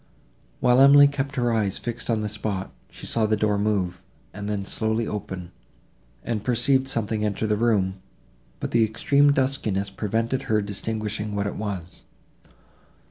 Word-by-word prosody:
While 125 0 +4
Emily 140 +1 +8
kept 140 -1 -3
her 120 -3 +1
eyes 105 -4 0
fixed 120 0 -5
on 110 -2 +1
the 105 - -2
spot, 105 -2 -4 0.2
she - - -10
saw 110 -2 +1
the 110 0 +1
door 105 -1 +1
move, 95 -4 -1 0.3
and 100 +1 -5
then 100 -2 -2
slowly 110 +2 -1
open, 95 -4 -5 0.7
and 110 -3 -2
perceived 130 +3 +2
something 110 -4 -1
enter 105 +1 -1
the 105 -1 +1
room, 100 -4 +1 0.6
but - - -4
the 115 -1 +4
extreme 140 +6 +3
duskiness 120 -8 0
prevented 115 +5 -1
her 110 -1 +3
distinguishing 105 +1 -3
what 100 0 -1
it 100 - -3
was. 95 -5 -5
110 Hz, 155 wpm, -24 LUFS, 100-120 Hz, 0.7 s, Emily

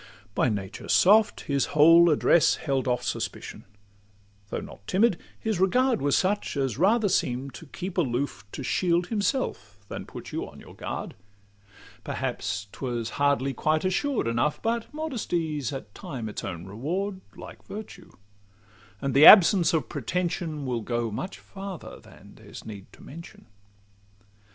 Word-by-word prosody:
By 125 - +2
nature 100 -3 -5
soft, 210 +3 +5
his 140 -1 0
whole 165 +3 +8
address 160 +2 +4
held 135 -3 -2
off 125 -1 0
Suspicion: - - -5 0.8
though - - -3
not 100 - -12
timid, 195 -2 +2 0.2
his 220 -5 -2
regard 250 +6 +2
Was 140 0 +2
such 195 -4 0
as 135 -3 -1
rather 210 +4 +3
seem'd 135 -7 -1
to 165 - -11
keep 185 +5 -5
aloof, 135 -2 -1
To - - -5
shield 175 +5 +1
himself 205 - -2
than - - -6
put - - -9
you - - -4
on - - -14
your - - -13
guard: - - -6 0.9
Perhaps 100 +1 -3
'twas 120 -4 -4
hardly 140 -1 +2
quite 155 +4 0
assured 255 +8 0
enough, 120 +6 0
But 230 0 -2
modesty 205 - -2
's 130 - -3
at 130 -7 -7
times 115 -6 -6
its - - -6
own 85 -2 -6
reward, 180 - -3 0.2
Like - - -11
virtue; 215 +1 -9 0.9
and 135 -1 -1
the 140 +3 +8
absence 185 -3 +8
of 155 -8 0
pretension 160 - -3
Will 120 -3 -2
go 120 0 -2
much 185 - -5
farther 195 -3 -9
than - - -16
there's - - -12
need 100 -3 -10
to - - -16
mention. 170 +4 -12
155 Hz, 150 wpm, -26 LUFS, 125-190 Hz, 0.9 s, whole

